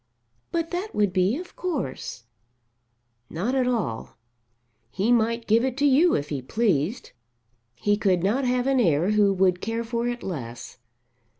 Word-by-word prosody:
"But 335 -1 -2
that 370 +4 -4
would 205 -3 +1
be 190 +6 +2
of 360 +1 -9
course." 275 - -4 1.1
"Not 200 +10 -2
at 260 -2 +1
all. 195 - -2 0.7
He 200 - 0
might 230 0 +2
give 225 +2 +3
it 260 -1 -2
to 285 - +2
you 290 +6 +5
if 145 +1 -2
he 140 -3 -3
pleased. 200 - -1 0.6
He 205 - +1
could 185 -5 +1
not 230 +8 +1
have 250 0 +1
an 270 -1 +2
heir 170 -2 +2
who 210 -2 +4
would 185 -2 +2
care 225 +1 -2
for 235 +1 -2
it 240 0 -4
less. 125 -10 -7
225 Hz, 160 wpm, -25 LUFS, 180-250 Hz, 1.1 s, you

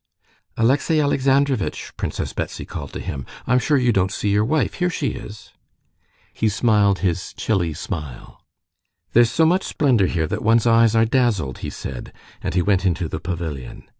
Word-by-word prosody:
"Alexey 140 +7 +2
Alexandrovitch!" 135 -4 +1
Princess - - -4
Betsy - - -4
called - - -7
to - - -5
him; 70 -2 -5 0.2
"I'm 125 +1 +3
sure 145 +3 +2
you 125 -2 +3
don't 95 -1 +1
see 105 - -2
your 105 +1 +3
wife: 155 +7 0
here 180 - +3
she 150 -6 -1
is." 105 0 -9 0.8
He 110 - +1
smiled 105 -2 +2
his 90 -1 -2
chilly 90 -7 0
smile. 75 -7 -7 0.7
"There's 120 0 +5
so 160 +7 +2
much 180 +4 +3
splendor 125 -10 +2
here 80 -3 0
that - - -3
one's 115 +1 +3
eyes 115 -1 +4
are 115 0 +4
dazzled," 110 - 0
he - - -5
said, 65 -3 -7 0.3
and - - -3
he 90 - +3
went 100 -1 +2
into 90 -2 0
the - - -5
pavilion. 80 -7 -5
110 Hz, 170 wpm, -21 LUFS, 90-125 Hz, 0.8 s, There's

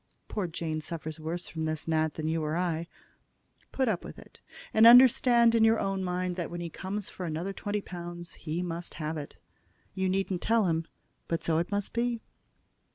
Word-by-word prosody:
Poor 205 -4 -2
Jane 160 -1 -3
suffers 155 0 -6
worse 165 +3 -4
from 160 -1 -4
this 155 0 -3
gnat 160 -1 +1
than 155 -1 -3
you 160 0 0
or 155 +2 -1
I. 170 -2 -1 0.8
Put 265 -1 0
up 205 -6 0
with - - -9
it; - - -15 0.3
and 220 +1 +8
understand 240 -1 +7
in 230 -1 +4
your 225 0 +5
own 195 -1 -1
mind 180 0 -2
that 175 -3 -3
when 175 - -5
he 170 -1 -5
comes 195 +4 -4
for 185 - -7
another 165 +5 -3
twenty 205 +1 -3
pounds 175 -2 -7
he 165 +2 -4
must 170 0 -5
have 155 0 -3
it. 145 -2 -7 0.6
You 190 -1 0
needn't 190 -1 -1
tell 225 -2 +3
him, 165 -1 0 0.4
but 165 - -2
so 160 -1 +2
it 170 - -2
must 205 -1 -2
be." 235 0 0
175 Hz, 195 wpm, -29 LUFS, 160-200 Hz, 0.8 s, and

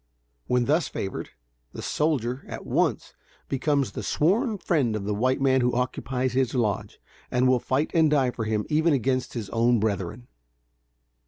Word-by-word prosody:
When 125 -1 +2
thus 155 +2 +2
favored, 95 - -5 0.4
the - - -7
"soldier," 135 -4 -1
at - - -7
once, - - 0 0.3
becomes 140 -3 0
the - - -5
sworn 210 - +1
friend 140 - +1
of 105 - -3
the 105 +1 -1
white 130 +6 +1
man 130 -1 +3
who 120 0 +1
occupies 125 0 -1
his 130 -1 +1
lodge, 110 -5 -1 0.3
and 125 +1 +2
will 130 -1 +4
fight 135 +6 -1
and 160 -2 +4
die 135 -4 +2
for 115 -2 -4
him 110 -1 -1
even 160 +1 +2
against 130 -1 0
his 110 -4 -5
own 120 0 +3
brethren. 105 +2 -2
130 Hz, 165 wpm, -26 LUFS, 115-145 Hz, 0.4 s, will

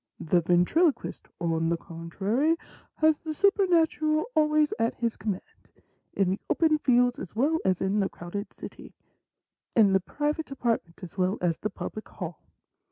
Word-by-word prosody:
The 175 +2 +2
ventriloquist, 180 - +2
on 165 -1 0
the 170 - +1
contrary, 195 - -1 0.4
has 315 -1 +3
the 315 -1 -5
supernatural 330 -5 +3
always 305 -1 +3
at 230 +1 +1
his 235 -1 -1
command, 200 -4 -6 0.4
in 190 -2 +2
the 195 - -2
open 315 -2 +3
fields 245 -2 +3
as 185 - -8
well 295 +8 +2
as 185 -2 +1
in 195 +2 +1
the 195 - +1
crowded 200 +5 -6
city; - - -11 0.8
in 205 -4 +5
the 190 - +5
private 295 - -2
apartment 230 -10 -2
as 180 +2 -9
well 185 +3 +1
as 175 -1 +2
in - - -53
the 215 - -1
public 215 +2 -7
hall. 175 -4 -7
225 Hz, 160 wpm, -27 LUFS, 180-305 Hz, 0.8 s, in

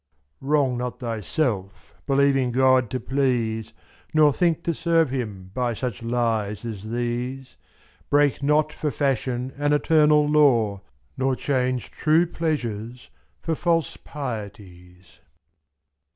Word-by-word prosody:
Wrong 140 -2 +1
not 125 0 -4
thyself, 115 - -3
believing 135 -2 +2
God 130 -1 +3
to 130 - -3
please. 120 -5 -1 0.4
Nor 150 -2 +5
think 170 0 +1
to 170 - 0
serve 165 -3 +1
Him 105 -8 -5
by 120 -1 -1
such 120 -3 -4
lies 115 -3 -1
as 110 -2 -6
these, 120 +3 -3 0.6
t24.Break 145 -2 +3
not 150 +2 +2
for 150 - -2
fashion 130 -2 -1
an 145 0 +1
eternal 150 0 +4
law. 120 -10 +3 0.4
Nor 130 0 +1
change 130 -2 -1
true 160 +2 +3
pleasures 125 -9 -4 0.3
for 165 - -1
false 165 0 0
pieties. 100 - -8
130 Hz, 115 wpm, -24 LUFS, 115-145 Hz, 0.6 s, Nor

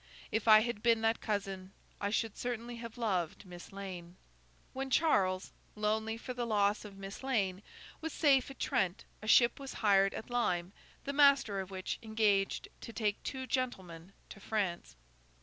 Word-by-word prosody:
If 220 +1 -1
I 215 -1 +9
had 235 -2 -3
been 230 -1 +3
that 225 0 +1
cousin, 195 -3 -3 0.3
I 200 - -1
should 220 0 -1
certainly 240 -1 -4
have 230 0 -8
loved 195 -6 -1
Miss 175 -1 -11
Lane. 185 -3 -7 0.6
When 270 0 -3
Charles, 195 - +2 0.2
lonely 220 +1 0
for 255 +2 -6
the 245 -1 -3
loss 205 -1 +2
of 200 -2 -10
Miss 195 +1 -8
Lane, 200 -8 0 0.4
was 320 0 -3
safe 280 -4 +3
at 270 - -10
Trent, 185 0 0 0.2
a 215 - -8
ship 235 +3 +5
was 275 -1 -7
hired 195 -2 +3
at 220 - -7
Lyme, 185 -7 0 0.3
the 280 - -3
master 280 -8 +5
of 190 -1 -5
which 190 -1 -4
engaged 215 -3 +1
to - - -7
take 210 -3 -1
two 260 -1 -4
gentlemen 190 -10 -3 0.2
to 200 - -10
France. 195 - -2
215 Hz, 165 wpm, -33 LUFS, 195-240 Hz, 0.6 s, I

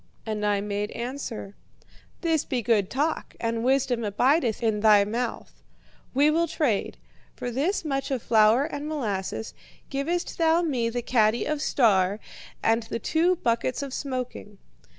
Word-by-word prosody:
"And 215 -1 -3
I 205 -1 +1
made 205 0 -2
answer: 240 -4 -5 0.7
'This 325 -4 +1
be 250 -3 -2
good 210 -4 +2
talk, 295 +4 -2
and 230 0 -1
wisdom 255 -2 +1
abideth 240 +3 +1
in 220 -2 +1
thy 210 -1 +6
mouth. 230 +3 -4 0.5
We 290 +3 +5
will 335 +2 +2
trade. 285 - -1 0.4
For 245 - -4
this 315 - -1
much 275 -2 -2
of 260 -4 -2
flour 220 +4 +4
and 295 -1 -5
molasses 220 -8 -3 0.4
givest 320 +7 -2
thou 330 +1 +3
me 250 -8 0
the 240 +1 -3
caddy 225 -1 +2
of 305 -1 -2
"Star" 205 -8 +2 0.4
and 225 +1 +3
the 225 +1 -4
two 330 - +2
buckets 245 -1 -1
of 275 -2 -6
smoking.' 255 -7 -5
245 Hz, 150 wpm, -26 LUFS, 215-285 Hz, 0.7 s, thy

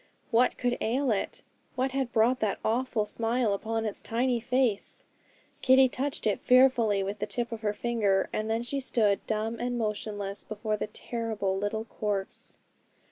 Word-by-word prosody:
What 245 +2 +3
could 245 -1 0
ail 255 +3 +1
it? 205 - -2 0.3
What 260 +1 0
had 265 -2 -1
brought 235 +3 +3
that 215 -2 0
awful 230 -1 +1
smile 230 0 0
upon 225 +2 -2
its 210 - -4
tiny 240 +1 0
face? 240 -3 0 0.6
Kitty 260 0 +6
touched 275 +3 -2
it 210 - +1
fearfully 245 -6 +4
with 200 +2 -4
the - - -2
tip 240 -1 -2
of 225 -1 -5
her 210 -2 +1
finger; 210 -3 +1
and 215 +1 -1
then 225 +1 0
she 275 +3 -2
stood 215 -6 +1
dumb 220 +1 -1
and 245 0 -1
motionless 205 -2 -3
before 215 0 -2
the 210 - -3
terrible 215 -3 -2
little 205 +3 -2
corpse. 205 -3 -4
225 Hz, 165 wpm, -29 LUFS, 210-245 Hz, 0.6 s, Kitty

